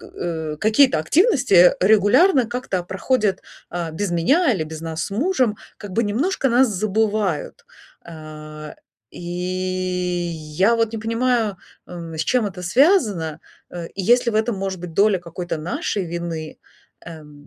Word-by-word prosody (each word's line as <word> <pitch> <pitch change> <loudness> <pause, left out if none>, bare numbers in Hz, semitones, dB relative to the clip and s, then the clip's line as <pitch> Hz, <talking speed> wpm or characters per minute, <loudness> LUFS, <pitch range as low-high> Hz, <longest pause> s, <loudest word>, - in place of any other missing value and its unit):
э, 160 -3 -5
какие-то 215 - +4
активности, 275 - +2
э, 175 0 +7
регулярно 220 - +4
как-то 240 -6 -3
проходят, 195 +2 -1 0.3
а, 170 -1 -4
без 180 +4 -3
меня 275 - +3
или 175 -7 -2
без 155 0 -8
нас 165 0 -4
с - - -7
мужем, 255 - 0 0.2
как 205 - -9
бы 230 +3 +1
немножко 270 - 0
нас 245 +1 +4
забывают. 210 -3 -1 0.4
А, 155 -2 -10 0.4
и - - -11
я 180 0 -1
вот 230 -1 0
не 225 - -4
понимаю, 230 -2 0 0.3
эм, 170 -2 -8
с 160 - -3
чем 250 -4 +1
это 185 -2 -7
связано, 205 - +2 0.3
э, 170 -1 -7
и 195 - -6
есть 245 +6 +3
ли 235 - +1
в - - -6
этом, 220 +2 +1
может 190 -2 -4
быть, 175 -2 -8
доля 200 0 +3
какой-то 175 0 -5
нашей 180 +4 -3
вины, 170 -2 -5 0.4
эм. 150 -3 -12
185 Hz, 150 wpm, -21 LUFS, 170-225 Hz, 0.4 s, э